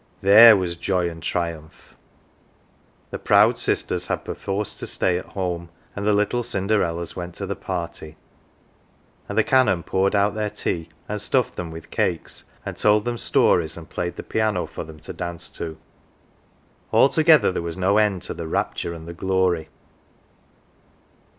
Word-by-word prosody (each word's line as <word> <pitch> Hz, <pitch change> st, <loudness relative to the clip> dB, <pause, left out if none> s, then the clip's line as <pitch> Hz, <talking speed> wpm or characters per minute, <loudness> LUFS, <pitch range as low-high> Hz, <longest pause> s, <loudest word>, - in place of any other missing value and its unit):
There 110 Hz, +3 st, +9 dB
was 90 Hz, -2 st, -2 dB
joy 85 Hz, 0 st, -1 dB
and 80 Hz, 0 st, -11 dB
triumph! 80 Hz, -2 st, -5 dB, 1.2 s
The -, -, -5 dB
proud -, -, +4 dB
sisters -, -, -1 dB
had -, -, -3 dB
perforce 100 Hz, +1 st, -3 dB
to -, -, -4 dB
stay 90 Hz, -1 st, 0 dB
at -, -, -11 dB
home, 85 Hz, -2 st, -3 dB, 0.3 s
and 100 Hz, 0 st, -3 dB
the 105 Hz, -, +4 dB
little 105 Hz, +4 st, +1 dB
Cinderellas 95 Hz, -6 st, -1 dB
went 90 Hz, -1 st, -6 dB
to -, -, -5 dB
the -, -, -3 dB
party; 85 Hz, -2 st, -6 dB, 1.1 s
and -, -, -4 dB
the -, -, +5 dB
Canon 105 Hz, -10 st, +3 dB
poured 95 Hz, +2 st, +1 dB
out 100 Hz, +1 st, +2 dB
their 105 Hz, -1 st, -2 dB
tea, 85 Hz, -5 st, -3 dB, 0.2 s
and 105 Hz, -1 st, -3 dB
stuffed 125 Hz, +3 st, 0 dB
them 85 Hz, -2 st, -5 dB
with 80 Hz, 0 st, -10 dB
cakes, 85 Hz, -3 st, -2 dB, 0.2 s
and -, -, -6 dB
told 105 Hz, 0 st, +3 dB
them 120 Hz, -1 st, -2 dB
stories, 85 Hz, -2 st, +3 dB
and 85 Hz, -, -11 dB
played 85 Hz, 0 st, -3 dB
the -, -, -7 dB
piano 110 Hz, -4 st, 0 dB
for 80 Hz, +1 st, -7 dB
them 80 Hz, -1 st, -12 dB
to -, -, -8 dB
dance 85 Hz, -1 st, -5 dB
to; 80 Hz, -2 st, -6 dB, 1.1 s
altogether 155 Hz, -, +5 dB
there 90 Hz, -, -3 dB
was 85 Hz, +1 st, -5 dB
no 95 Hz, +3 st, +3 dB
end 105 Hz, -4 st, +1 dB
to -, -, -4 dB
the 85 Hz, -, -6 dB
rapture 85 Hz, +1 st, -2 dB
and 80 Hz, 0 st, -10 dB
the 85 Hz, -, -6 dB
glory. 95 Hz, -3 st, 0 dB
90 Hz, 165 wpm, -23 LUFS, 85-105 Hz, 1.2 s, There